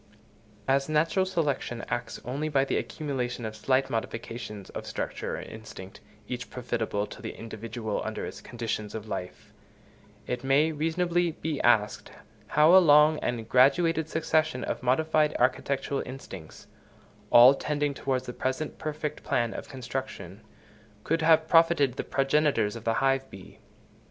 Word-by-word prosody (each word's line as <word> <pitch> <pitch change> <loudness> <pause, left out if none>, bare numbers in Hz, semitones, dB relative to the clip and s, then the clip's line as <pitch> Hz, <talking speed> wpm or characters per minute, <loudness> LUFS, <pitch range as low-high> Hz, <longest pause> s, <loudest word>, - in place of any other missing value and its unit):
As 135 +2 +2
natural 165 +5 +2
selection 145 -9 -2
acts 120 -1 -4
only 140 +5 -2
by 135 -2 +2
the - - -1
accumulation 125 -6 -3
of 110 0 -5
slight 130 +5 +1
modifications 115 -2 -5
of - - -7
structure - - -4
or - - -5
instinct, 105 -3 -10 0.3
each 125 -3 -5
profitable 115 -4 -2
to 130 - -11
the 115 - -6
individual 115 0 -5
under - - -4
its - - -8
conditions 115 -3 -4
of 110 0 -6
life, 90 -3 -7 0.7
it 125 0 -3
may 140 +4 +3
reasonably 170 +2 0
be 155 -2 -3
asked, 110 -3 +2 0.4
how 155 +4 +5
a 190 - +9
long 150 -1 +6
and 115 -2 -3
graduated 155 +6 +3
succession 155 -4 0
of - - -3
modified 150 +4 +2
architectural 135 +2 0
instincts, 95 - -10 0.6
all 120 +3 +9
tending 145 0 -1
towards 130 -1 -2
the 125 - -6
present 130 +5 -3
perfect 150 -1 -4
plan 120 -4 0
of - - -7
construction, 130 -7 -6 0.6
could 165 +1 0
have 160 0 +4
profited 165 -5 +4
the - - -4
progenitors 135 -5 +1
of 115 - -9
the 115 0 +1
hive 135 0 +1
bee? 95 -1 -13
135 Hz, 145 wpm, -28 LUFS, 115-155 Hz, 0.7 s, a